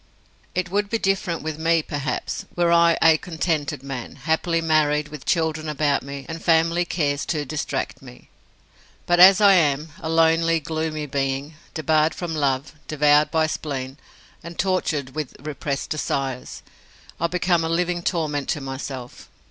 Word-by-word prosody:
It 180 -1 -1
would 205 +1 0
be 230 - +1
different 190 -6 -1
with 155 0 -4
me, 165 0 +2
perhaps, 145 -3 -3
were 175 -1 +2
I 170 0 +5
a 160 -1 +6
contented 160 -5 -2
man, 135 -3 -6
happily 165 +1 0
married, 155 -2 +2
with 150 -3 -9
children 160 -2 0
about 150 -1 +1
me, 140 0 -8
and 165 0 -7
family 165 +1 +3
cares 145 -5 -1
to 150 -3 -1
distract 150 +2 -3
me. - - -14 0.8
But 175 0 +2
as 190 +2 +9
I 200 -2 +7
am 150 -3 +2
a 160 - -5
lonely, 165 0 +3
gloomy 155 0 -3
being, 140 +1 -2 0.2
debarred 155 0 +2
from 175 -2 -4
love, 140 -1 -1
devoured 150 0 +4
by 160 -1 +2
spleen, 140 -3 -4 0.4
and 170 +1 -10
tortured 165 -8 -1
with 155 -3 -5
repressed 140 -1 -4
desires 135 -4 -3 0.6
I 170 - +1
become 175 -1 +1
a 160 - -1
living 175 +1 0
torment 155 -5 -1
to - - 0
myself. 135 -2 -7
155 Hz, 155 wpm, -23 LUFS, 145-170 Hz, 0.8 s, as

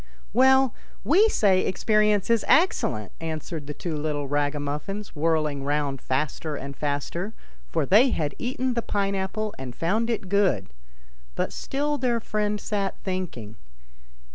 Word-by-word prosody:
" 65 - -29
Well, 265 +1 +5 0.3
we 395 +9 +5
say 195 - +3
experience 210 +1 +2
is 230 -2 +3
excellent," 110 - +2
answered 160 -1 -5
the 150 - -4
two 170 -3 -4
little 145 -1 -2
ragamuffins, 145 +8 -2
whirling 155 -2 +1
round 145 -1 -1
faster 150 +3 -2
and 140 0 -6
faster; 150 - -3 0.3
for 60 - 0
they 220 - +6
had 150 - -1
eaten 255 +1 -1
the 235 - 0
pine 200 -2 -1
apple 195 +2 -2
and 130 -2 -6
found 215 +8 0
it 220 -4 -2
good. 185 - +2 0.7
But - - -1
still 290 +2 -2
their 240 -2 +1
friend 210 -2 -1
sat 200 -3 -2
thinking. 160 - -4
185 Hz, 140 wpm, -25 LUFS, 145-215 Hz, 0.7 s, they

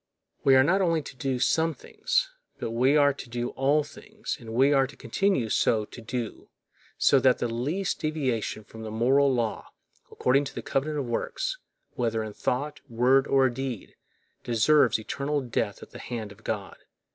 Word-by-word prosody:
We 135 - +6
are 130 - +7
not 190 +7 +2
only 165 -4 +1
to 130 - -10
do 130 0 -2
some 160 +5 +1
things, - - -1 0.3
but 115 - -4
we 130 +5 +3
are 145 -1 +5
to 130 - -10
do 120 0 -3
all 145 +3 +2
things, 215 +8 -7
and 115 -2 -9
we 135 +5 +4
are 135 -1 +3
to 140 - -14
continue 130 - 0
so 110 0 +2
to 120 - -11
do, 115 -1 -5 0.5
so 140 - +5
that 130 -1 +4
the 120 - -1
least 145 +12 -2
deviation 130 -8 -2
from 110 +2 -12
the 110 - -6
moral 130 +6 +3
law, 120 -4 -2 0.4
according 135 +3 +2
to - - -8
the - - -5
covenant 150 +3 -1
of 140 - -2
works, - - -3 0.3
whether 115 -2 -1
in 110 -1 -7
thought, 145 +7 -2
word, 125 +4 +3
or 135 -1 +4
deed, 125 -3 -5 0.5
deserves 125 +3 +4
eternal 140 +6 -2
death 115 -6 -3
at - - -14
the - - -10
hand 110 -4 -5
of 105 +2 -16
God. 100 -5 -4
130 Hz, 180 wpm, -27 LUFS, 115-150 Hz, 0.5 s, are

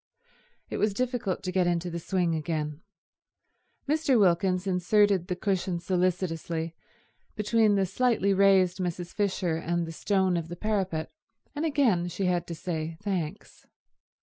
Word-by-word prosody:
It - - -2
was 210 -2 +1
difficult 245 -5 -2
to 185 - -2
get 180 -1 +2
into 175 0 -1
the 170 - -3
swing 175 -1 0
again. 155 -1 -3 1.1
Mr. 295 -3 +2
Wilkins 185 0 +2
inserted 190 0 +2
the 180 - -2
cushion 185 -2 -1
solicitously 170 -2 -1 0.6
between 215 0 +3
the 195 -1 +2
slightly 200 0 +1
raised 190 -2 +4
Mrs. 175 -1 -3
Fisher 190 -5 0
and 170 +1 -1
the 165 - -6
stone 190 +1 +1
of 165 -1 -3
the 175 - -6
parapet, 190 -5 -2 0.4
and 300 +2 -2
again 255 - +2
she 185 +2 -3
had 175 -1 0
to 170 - -5
say 160 -2 -4
"Thanks." 190 -3 -4
185 Hz, 145 wpm, -28 LUFS, 170-200 Hz, 1.1 s, raised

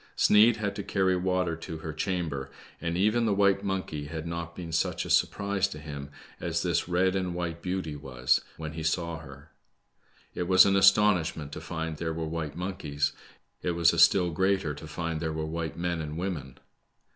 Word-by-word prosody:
Sneid 110 +2 +6
had 105 -3 -3
to - - -2
carry 95 -2 +1
water 90 -2 0
to 80 0 -7
her 80 0 -6
chamber, 80 -6 -2 0.3
and 85 +1 -1
even 110 +4 +2
the 100 - +2
white 100 0 +3
monkey 95 -7 -3
had 80 +1 -5
npt 85 0 -5
been 85 -2 -7
such 80 - 0
a - - -4
surprise 100 -1 +2
to 100 - -8
him, 70 -2 -7 0.3
as - - -1
this - - 0
red 90 +2 +2
and 90 -2 -1
white^ 85 -1 -3
beauty 90 -4 -3
was 65 -4 +1 0.2
when 80 -1 -6
he 80 - -5
saw 85 +1 -1
her. 70 0 -13 0.8
It 90 - -3
was 95 0 +8
an 100 0 +3
astonishment 95 -6 +4
to 75 - -7
find 80 -1 -4
there 80 0 -3
were 80 -1 -2
white 80 -2 -4
monkeys. 90 -6 -2 0.5
It 90 - -1
was 85 0 +4
a 85 - 0
still 90 0 +5
greater 95 -2 +1
to 75 +2 -9
find 80 +1 -3
there 80 -1 -2
were 80 0 -2
white 80 0 -4
men 85 -1 -1
and 75 0 -5
women. 85 -8 -4
85 Hz, 190 wpm, -28 LUFS, 80-95 Hz, 0.8 s, was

